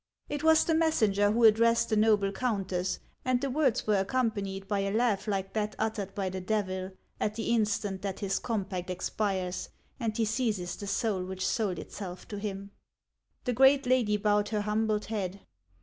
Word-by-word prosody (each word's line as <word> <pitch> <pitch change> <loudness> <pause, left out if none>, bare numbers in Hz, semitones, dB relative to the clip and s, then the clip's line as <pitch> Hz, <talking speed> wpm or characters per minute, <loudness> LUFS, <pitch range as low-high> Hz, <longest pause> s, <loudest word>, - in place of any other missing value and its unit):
" - - -38
It 290 - -5
was 320 0 +6
the 325 - +1
messenger 215 -11 +3
who 235 +2 +1
addressed 230 +1 +5
the 220 - +2
noble 210 -2 +3
countess, 195 -5 -1 0.3
and 255 -1 +2
the 275 +1 -2
words 275 -4 +1
were 210 -2 +3
accompanied 195 -3 -1
by 205 -1 0
a 195 0 0
laugh 220 -2 +1
like 195 -2 -2
that 210 -1 -1
uttered 210 -3 -2
by 195 -2 -1
the 185 0 -5
Devil, 190 -2 -2 0.3
at 210 - -1
the 230 - -2
instant 205 -3 0
that 195 -2 -4
his 195 -2 -1
compact 195 -6 -3
ex 180 - -3
pires 190 -4 -2 0.3
and 225 -3 -2
he 225 - +2
seizes 215 -6 -1
the 200 - -7
soul 200 -2 0
which 185 0 -4
sold 190 -2 0
itself 185 -3 -7
to 205 - -5
him. 200 -1 -5 0.7
The 250 - 0
great 270 +3 +5
lady 245 -5 +3
bowed 210 0 +2
her 215 -2 0
humbled 210 0 0
head. 200 -3 -3
210 Hz, 185 wpm, -29 LUFS, 195-225 Hz, 0.7 s, was